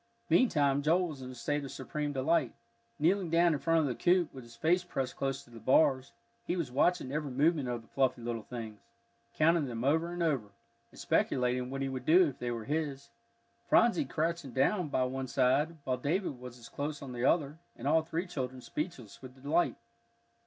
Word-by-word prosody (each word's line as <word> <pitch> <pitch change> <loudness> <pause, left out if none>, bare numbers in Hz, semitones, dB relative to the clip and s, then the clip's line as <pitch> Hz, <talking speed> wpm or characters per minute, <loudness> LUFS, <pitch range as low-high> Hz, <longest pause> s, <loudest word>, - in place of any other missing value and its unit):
Meantime 145 - +3
Joel 170 +4 +2
was 140 -4 -8
in 130 - -7
a 130 - -9
state 145 +4 -2
of 135 - -6
supreme 145 +3 -4
delight. 140 -1 +1 0.4
Kneeling 180 +3 +2
down 170 +1 +4
in 145 - -1
front 165 +1 +2
of - - +1
the 130 - -1
coop, 175 +6 +2
with 130 - -9
his 120 0 -14
face 170 +7 +2
pressed 135 -7 -3
close 135 0 -2
to 120 - -21
the 115 - -11
bars, 130 +1 +3 0.3
he 175 - -2
was 155 -8 -3
watching 145 +1 +1
every 150 0 -2
movement 145 +1 +1
of 120 -1 -3
the - - -22
fluffy 130 -3 0
little 115 -1 -3
things, 110 -2 -7 0.6
counting 165 0 +3
them 115 -1 -4
over 160 +5 +2
and 175 0 -2
over, 140 -10 0 0.4
and - - -16
speculating 125 0 +1
what 135 +1 -3
he - - -1
would 130 -1 -5
do 175 +2 +6
if 140 - -7
they 120 - -3
were 115 -2 -4
his, 145 -2 -3 0.6
Phronsie 240 +6 +4
crouching 165 - -2
down 160 - +2
by 130 -3 +1
one 130 +1 -3
side, 140 +6 +2
while 130 -2 -1
David 145 +1 -1
was 125 -1 -9
as 115 -1 -12
close 145 +2 -5
on 135 - -7
the 120 0 -4
other, 150 +1 +2 0.2
and 125 - -5
all 160 +2 +4
three 165 +2 -3
children 130 -7 -4
speechless 135 - -6
with 130 0 -12
delight. 145 -3 +2
140 Hz, 205 wpm, -31 LUFS, 125-165 Hz, 0.6 s, do